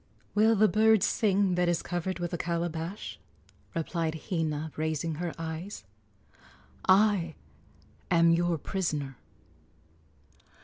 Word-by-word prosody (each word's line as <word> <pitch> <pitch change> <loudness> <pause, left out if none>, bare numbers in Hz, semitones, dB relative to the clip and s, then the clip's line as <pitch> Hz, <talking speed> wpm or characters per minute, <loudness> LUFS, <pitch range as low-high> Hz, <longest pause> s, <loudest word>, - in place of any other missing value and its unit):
"Will 220 +2 +4
the 215 +1 +5
bird 220 -1 +4
sing 200 -3 +2
that 180 0 +2
is 170 -1 0
covered 175 +1 -2
with 175 0 -4
a - - 0
calabash?" 170 +2 -3 0.6
replied 165 -1 -1 0.2
Hina, 160 -3 -1
raising 155 +1 -1
her 175 -2 -2
eyes. 165 - -5 1.1
"I 190 -5 +4 0.7
am 170 -1 +5
your 170 0 +2
prisoner." 150 -6 -3
175 Hz, 105 wpm, -29 LUFS, 160-190 Hz, 1.1 s, the